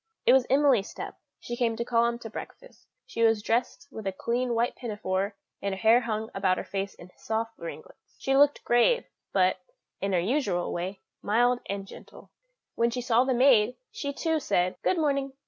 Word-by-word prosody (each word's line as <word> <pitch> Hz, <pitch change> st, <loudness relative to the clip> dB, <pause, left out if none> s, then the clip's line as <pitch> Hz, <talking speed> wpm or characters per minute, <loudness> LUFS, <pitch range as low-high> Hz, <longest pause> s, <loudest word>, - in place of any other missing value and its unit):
It 245 Hz, -, +6 dB
was 260 Hz, -2 st, +4 dB
Emily's 270 Hz, -7 st, +3 dB
step; -, -, -8 dB, 0.2 s
she 240 Hz, -, -5 dB
came 235 Hz, -2 st, 0 dB
to 235 Hz, -, -3 dB
call 235 Hz, -1 st, +3 dB
him 235 Hz, 0 st, -2 dB
to 225 Hz, -, -6 dB
breakfast; -, -, -10 dB, 0.2 s
she 475 Hz, -, -5 dB
was 225 Hz, -2 st, +3 dB
dressed 240 Hz, +5 st, -1 dB
with 220 Hz, -5 st, -6 dB
a -, -, +1 dB
clean 240 Hz, +5 st, -1 dB
white 235 Hz, +2 st, +1 dB
pinafore, 205 Hz, -4 st, -3 dB, 0.3 s
and 200 Hz, -1 st, -2 dB
her -, -, -9 dB
hair 230 Hz, +3 st, +5 dB
hung 220 Hz, -1 st, -3 dB
about 190 Hz, -2 st, +1 dB
her -, -, -3 dB
face 195 Hz, 0 st, -4 dB
in 175 Hz, +1 st, -14 dB
soft 225 Hz, +1 st, -2 dB
ringlets; 170 Hz, -, -10 dB
she 270 Hz, -, 0 dB
looked 290 Hz, +1 st, +4 dB
grave, 470 Hz, -, +3 dB, 0.3 s
but, 185 Hz, -1 st, +3 dB, 0.4 s
in 195 Hz, 0 st, -1 dB
her 180 Hz, -, +3 dB
usual 195 Hz, -, 0 dB
way, 185 Hz, +3 st, -4 dB, 0.2 s
mild 245 Hz, +4 st, +2 dB
and 200 Hz, 0 st, -4 dB
gentle. -, -, -13 dB, 0.4 s
When 235 Hz, 0 st, +2 dB
she 245 Hz, +1 st, -3 dB
saw 245 Hz, +1 st, +3 dB
the 260 Hz, -1 st, +1 dB
maid, 245 Hz, -3 st, +5 dB, 0.2 s
she, 280 Hz, -, -4 dB
too, 320 Hz, +2 st, 0 dB
said, 180 Hz, -9 st, 0 dB
"Good 370 Hz, -, +1 dB
morning." 275 Hz, -3 st, 0 dB
230 Hz, 195 wpm, -27 LUFS, 200-255 Hz, 0.4 s, It